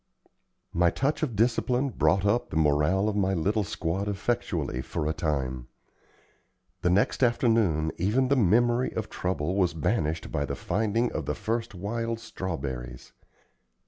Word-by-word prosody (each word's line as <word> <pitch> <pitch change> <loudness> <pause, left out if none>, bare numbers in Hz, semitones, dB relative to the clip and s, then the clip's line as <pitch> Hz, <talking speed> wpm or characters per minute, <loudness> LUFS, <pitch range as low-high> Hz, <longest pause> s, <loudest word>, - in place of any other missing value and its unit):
My 85 0 +4
touch 140 - -1
of 135 -8 -1
discipline 125 +4 +1
brought 95 -5 +2
up 120 +4 +1
the - - -6
morale 80 +6 +3
of 105 - -1
my 95 -1 +1
little 105 +6 +1
squad 95 +2 -2
effectually 95 - -1
for 75 - -4
a 80 - 0
time. 65 -6 -2 1.1
The 90 - +2
next 95 +8 +2
afternoon 110 - +2
even 110 +9 +2
the 140 - +3
memory 120 +3 +3
of 110 -1 -3
trouble 90 -1 -2
was 90 -4 +2
banished 80 -2 -1
by 70 -2 0
the - - -4
finding 110 +3 0
of - - -4
the - - -1
first 115 -2 -3
wild 115 +4 -3
strawberries. 65 - -6
100 Hz, 145 wpm, -27 LUFS, 80-115 Hz, 1.1 s, My